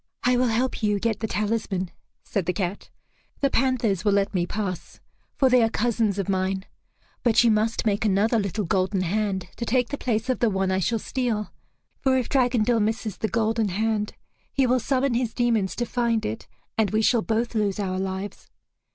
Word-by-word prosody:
"I 250 0 +3
will 250 +1 +3
help 240 +3 0
you 210 -2 +1
get 225 -1 -1
the 220 - -2
talisman," 210 -4 -1 0.3
said 190 -5 -2
the 180 - +1
cat. 190 0 -3 0.5
"The 275 -1 +2
panthers 235 -7 +1
will 205 -2 +3
let 200 0 +1
me 175 -2 0
pass, 185 -5 -4 0.4
for 270 - +3
they 250 -1 +5
are 225 - +3
cousins 225 -3 0
of 195 - -2
mine. 190 0 -1 0.6
But 230 -1 +4
you 235 - +5
must 220 +2 +1
make 205 -1 +1
another 215 +3 +2
little 200 +1 -2
golden 190 +2 +1
hand 190 0 -1
to - - -3
take 245 +1 +1
the 285 - -4
place 225 -1 -1
of 255 - 0
the 235 - +3
one 190 -1 0
I 190 - +1
shall 225 +5 +1
steal; 225 -2 -2 0.5
for 265 -1 +2
if 250 - -1
Dragondel 245 -3 +2
misses 215 -1 -1
the 220 - 0
golden 225 +1 +1
hand, 210 +2 -1 0.4
he 270 - +2
will 250 +1 +3
summon 265 +1 +1
his 235 -1 -1
demons 230 -6 +1
to 240 - -1
find 235 -2 0
it, 110 - -4 0.3
and 215 -3 +3
we 215 +1 +1
shall 235 +1 +4
both 230 +2 -1
lose 210 -3 0
our 185 -2 -1
lives. 190 +1 -5
220 Hz, 195 wpm, -25 LUFS, 195-240 Hz, 0.6 s, they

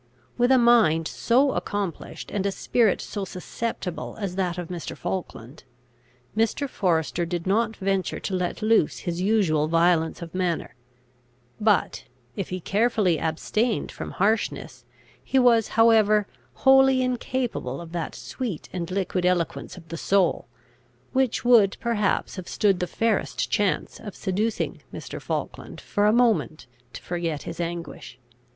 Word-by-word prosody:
With 245 +1 +2
a 260 - +7
mind 225 -10 +4
so 265 +4 +2
accomplished 205 -8 -4
and 200 -2 -1
a - - 0
spirit 220 +1 +1
so 205 - -5
susceptible 185 0 -5
as 195 -4 -3
that 180 -2 -1
of 175 -2 -5
Mr. 175 -2 -6
Falkland, 145 -7 -6 0.7
Mr. 225 +6 +1
Forester 175 - 0
did 170 0 -3
not 220 +3 +1
venture 195 -1 -1
to 195 - -4
let 180 +4 -2
loose 220 -8 +3
his 175 0 -2
usual 185 -7 +2
violence 165 0 +2
of 165 - -10
manner; 180 -2 -1 0.9
but, 210 -2 +1 0.3
if 195 - -4
he 185 - -3
carefully 200 -3 +1
abstained 210 +8 -1
from - - -7
harshness, 215 +4 -1 0.4
he 270 - 0
was 240 -4 +5
however 215 -2 +5 0.4
wholly 265 -1 +6
incapable 245 - -2
of 170 -1 -9
that 170 -4 -4
sweet 155 - -5
and 175 -2 -4
liquid 185 -1 -1
eloquence 180 0 -1
of 165 -2 -14
the 165 - -5
soul, 195 +2 +1 0.7
which 260 -2 +1
would 225 -5 +5
perhaps 220 -4 0
have 185 - -7
stood 195 -4 +2
the 180 - -1
fairest 225 +1 -1
chance 205 -3 0
of 205 - -8
seducing 210 +4 -2
Mr. - - -7
Falkland - - -5
for 205 0 0
a - - +5
moment 215 - +2 0.3
to - - -10
forget 170 -4 -3
his 165 - -7
anguish. 170 -6 -5
195 Hz, 145 wpm, -25 LUFS, 170-225 Hz, 0.9 s, a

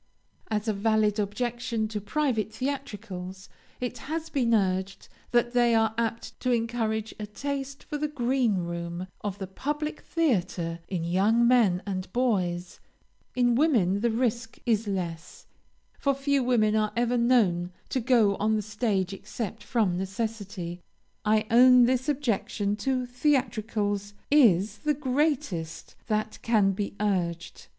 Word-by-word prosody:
As 215 0 -1
a 215 - +2
valid 215 0 +2
objection 230 +1 -2
to 210 -1 -4
private 225 -2 0
theatricals, 205 -8 -5 0.3
it 250 -1 -4
has 320 +2 -4
been 250 -5 +1
urged 195 -2 0 0.2
that 240 0 +2
they 240 -1 +4
are 220 -1 +3
apt 230 0 -3
to 255 - 0
encourage 225 -2 -1
a 210 - -4
taste 275 +4 -5
for 295 - -5
the 300 - 0
green 255 -5 +1
room 170 0 -4 0.2
of 200 -2 -3
the 195 - -4
public 295 +10 -4
theatre 180 - -1
in 180 -4 -3
young 205 +7 +3
men 220 -8 +4
and 185 -2 -4
boys; 185 -8 0 0.6
in 245 -1 +3
women 230 - +3
the 235 - +2
risk 235 0 -1
is 225 -2 +1
less, 175 -4 -4 0.5
for 275 -1 +1
few 275 0 +1
women 220 -4 +3
are 215 -1 +1
ever 240 +1 +2
known 215 -8 +2 0.2
to 260 - 0
go 230 -5 +3
on 220 +1 +1
the 215 - -1
stage 205 -3 -1
except 215 +2 -6
from 205 -7 +1
necessity. 195 -3 -4 0.4
I 215 0 +2
own 250 +1 +8
this 255 +3 +1
objection 220 -7 0
to 255 +1 -1
theatricals 220 -6 -1 0.2
is 210 - +4
the 300 +4 0
greatest 265 - -1
that 215 -1 -1
can 215 -4 +3
be 200 +1 -4
urged. 175 -5 -2
220 Hz, 140 wpm, -27 LUFS, 195-250 Hz, 0.6 s, own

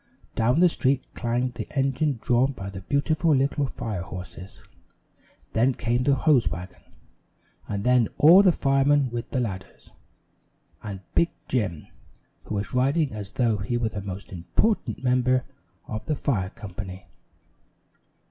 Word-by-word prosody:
Down 120 +4 +2
the 180 +2 +6
street 135 -5 +1
clanged 120 +1 -1
the - - -7
engine 135 +1 +1
drawn 125 +3 +2
by 95 -5 -7
the 95 -1 -8
beautiful 155 - +1
little 140 +1 +1
fire 110 -7 -4
horses. 90 +1 -9 0.9
Then 125 +3 +3
came 120 +1 0
the 140 -1 +4
hose 135 - +3
wagon, 90 +5 -7 0.9
and 100 -1 -3
then 125 -2 +4
all 170 +6 +8
the 190 -3 +5
firemen 135 -2 +2
with 120 0 -4
the 130 - -1
ladders, 95 -6 -6 0.9
and 100 -3 -6
Big 170 - +3 0.2
Jim, 100 - -1 0.6
who 110 - -4
was 100 0 -3
riding 140 +4 +2
as 100 -2 -7
though 115 -4 +1
he 105 +5 -2
were 115 -2 0
the 105 -2 -5
most 100 0 -7
important 115 - -1
member 125 0 +2 0.4
of 110 - -6
the 155 - +1
fire 100 -11 -1
company. 95 -3 -8
120 Hz, 145 wpm, -25 LUFS, 100-135 Hz, 0.9 s, all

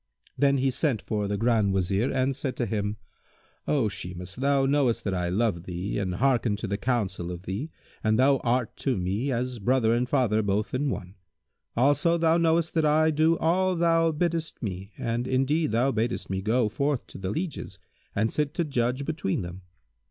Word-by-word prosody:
Then 140 -1 +3
he 135 0 +1
sent 130 -2 0
for 105 -2 -2
the 100 0 -1
Grand 110 -3 +2
Wazir 95 +6 +1
and 130 +1 +1
said 135 -1 -3
to 120 - -1
him, 105 -1 -2 0.7
"O 135 -7 +2
Shimas, 90 -1 -6
thou 140 +1 +2
knowest 135 -4 +2
that 100 - -1
I 90 -1 -1
love 95 -3 0
thee 90 +3 -3
and 95 -3 -2
hearken 125 -4 +2
to 105 - -5
the 100 -1 -1
counsel 100 -8 -1
of 90 0 -7
thee 100 - -4 0.3
and 110 0 +2
thou 135 +2 +5
art 120 -2 -1
to 135 -4 0
me 100 +9 -1
as 125 0 -2
brother 115 +1 +2
and 125 +1 0
father 110 -5 +2
both 105 +1 -1
in 140 +3 0
one; 90 -5 -6 0.6
also 145 +7 +3
thou 165 0 +3
knowest 165 0 +2
that 160 -2 +2
I 155 +1 +4
do 160 +2 +3
all 185 +3 +2
thou 165 -1 +3
biddest 165 -2 -2
me 95 -1 -5
and 120 -1 -2
indeed 140 +5 +1
thou 120 +5 +2
badest 115 -4 -2
me 95 0 -1
go 110 +3 +2
forth 140 +4 -1
to - - -11
the 95 -1 -3
lieges 155 - -4 0.4
and 110 +2 +1
sit 150 -1 -1
to 170 - +1
judge 130 -2 -1
between 150 - -2
them. 90 +2 -8
125 Hz, 190 wpm, -27 LUFS, 100-145 Hz, 0.7 s, thou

